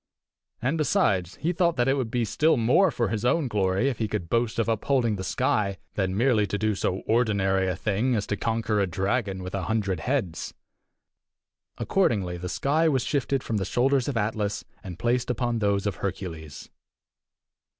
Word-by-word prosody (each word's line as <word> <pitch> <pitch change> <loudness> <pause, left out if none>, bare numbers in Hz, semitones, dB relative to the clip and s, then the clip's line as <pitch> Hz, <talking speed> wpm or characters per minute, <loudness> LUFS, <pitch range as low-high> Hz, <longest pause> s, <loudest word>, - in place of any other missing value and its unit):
And, 145 +6 0
besides, 95 - +1
he 170 - -1
thought 170 -1 +2
that 120 +1 +1
it 135 - +4
would 130 -5 -1
be 120 0 0
still 155 +8 +2
more 125 +12 +4
for 115 - -1
his 110 -1 -2
own 140 +4 +2
glory 100 +1 +1
if 130 -5 -2
he 110 - 0
could 100 -5 -4
boast 115 0 +1
of 115 - +1
upholding 115 0 +1
the 95 - -5
sky 100 +1 0 0.2
than 95 -1 -1
merely 115 -3 +3
to 100 - -2
do 110 0 +1
so 95 -1 -1
ordinary 100 -5 +2
a 90 - 0
thing 110 +7 0
as 105 - -1
to 105 - -2
conquer 110 0 -1
a 100 - +2
dragon 95 +2 -1
with 90 - -6
a 95 -3 -2
hundred 100 -4 -1
heads. 115 - -2 1.2
Accordingly, 100 - +1
the 90 +1 -5
sky 155 - +2
was 135 -5 +1
shifted 135 -1 -1
from 110 - -2
the 100 - -1
shoulders 130 +6 +1
of 140 -4 -1
Atlas, 105 -1 -1 0.2
and 90 -3 -7
placed 120 +6 0
upon 120 -1 0
those 100 -1 +1
of 100 -3 -2
Hercules. 85 -6 -6
110 Hz, 185 wpm, -26 LUFS, 95-125 Hz, 1.2 s, it